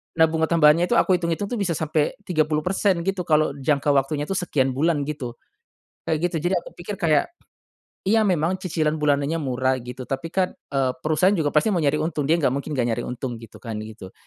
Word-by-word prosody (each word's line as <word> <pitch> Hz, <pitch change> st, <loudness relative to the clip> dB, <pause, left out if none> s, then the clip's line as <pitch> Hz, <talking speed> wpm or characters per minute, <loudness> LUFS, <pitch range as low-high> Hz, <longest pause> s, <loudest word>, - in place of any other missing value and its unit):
Nah, 160 Hz, 0 st, +6 dB
bunga 160 Hz, 0 st, 0 dB
tambahannya 165 Hz, +1 st, +4 dB
itu 240 Hz, -, +1 dB
aku 185 Hz, -5 st, +4 dB
hitung-hitung 170 Hz, +4 st, -2 dB
tuh 240 Hz, -, -2 dB
bisa 180 Hz, -5 st, 0 dB
sampe 155 Hz, 0 st, 0 dB
30% 170 Hz, +2 st, +1 dB
gitu 190 Hz, -1 st, -2 dB
kalo 155 Hz, -2 st, +3 dB
jangka 140 Hz, +1 st, +1 dB
waktunya 140 Hz, +1 st, +1 dB
tuh 195 Hz, +5 st, -2 dB
sekian 140 Hz, -7 st, 0 dB
bulan 145 Hz, +3 st, +1 dB
gitu. 140 Hz, -5 st, -5 dB, 0.7 s
Kayak 155 Hz, -, +1 dB
gitu 170 Hz, -, -3 dB
jadi 190 Hz, -, +1 dB
aku 170 Hz, -, -4 dB
pikir 175 Hz, +4 st, -6 dB
kayak, 160 Hz, -6 st, +2 dB, 0.8 s
iya, 220 Hz, +3 st, +4 dB
memang 180 Hz, -3 st, +1 dB
cicilan 155 Hz, -4 st, 0 dB
bulanannya 145 Hz, 0 st, +1 dB
murah 130 Hz, -1 st, 0 dB
gitu 125 Hz, +1 st, -8 dB
tapi 140 Hz, +5 st, -3 dB
kan, 185 Hz, 0 st, 0 dB, 0.2 s
eee, 135 Hz, -2 st, +1 dB
perusahaan 160 Hz, +5 st, +3 dB
juga 155 Hz, -5 st, +1 dB
pasti 180 Hz, +9 st, +2 dB
mau 175 Hz, -, +1 dB
nyari 145 Hz, 0 st, +2 dB
untung 155 Hz, -2 st, -1 dB
dia 165 Hz, -, +4 dB
gak 135 Hz, -5 st, +2 dB
mungkin 140 Hz, +2 st, -4 dB
gak 120 Hz, -1 st, +1 dB
nyari -, -, -2 dB
untung 125 Hz, 0 st, -4 dB
gitu 115 Hz, -2 st, -12 dB
kan 110 Hz, -3 st, -6 dB
gitu. 110 Hz, -3 st, -10 dB
155 Hz, 200 wpm, -23 LUFS, 140-175 Hz, 0.8 s, Nah